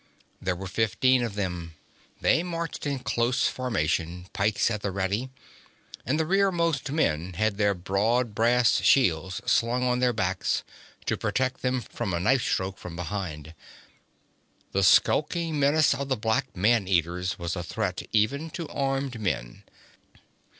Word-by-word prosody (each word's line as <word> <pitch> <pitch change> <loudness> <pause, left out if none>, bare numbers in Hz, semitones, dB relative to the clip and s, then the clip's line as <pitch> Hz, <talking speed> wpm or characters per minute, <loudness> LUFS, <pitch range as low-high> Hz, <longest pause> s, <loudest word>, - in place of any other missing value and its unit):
There 90 -1 -1
were 95 +2 -7
fifteen 115 +6 +2
of 115 -4 -3
them; 90 -5 -4 0.5
they 160 - +3
marched 170 -4 -4
in 140 -1 -1
close 125 +1 +1
formation, 85 -7 -1
pikes 105 +3 +1
at 105 -2 -3
the 100 - -1
ready, 100 +6 -2 0.8
and 145 +5 +1
the 160 - +1
rearmost 170 -6 +1
men 90 - 0
had 105 +3 0
their 100 -1 +3
broad 105 +6 0
brass 115 -2 +3
shields 95 - +2
slung 120 +2 +2
on 125 0 +1
their 125 -1 +3
backs, 95 -5 -1 0.4
to - - 0
protect 130 0 -1
them 125 -1 0
from 95 -4 -4
a - - -1
knife 130 +8 +3
stroke 95 -2 -2
from 85 -2 -8
behind. 85 -4 -5 1.2
The 100 - +1
skulking 155 - +3
menace 145 +2 +4
of 140 0 -4
the 130 - +1
black 110 -2 -1
man 105 +1 +3
eaters 90 0 0
was 85 0 -3
a 90 - -3
threat 95 +1 -3
even 140 +9 +1
to 165 -3 -5
armed 135 -4 -2
men. 65 - -3
110 Hz, 150 wpm, -26 LUFS, 90-130 Hz, 1.2 s, menace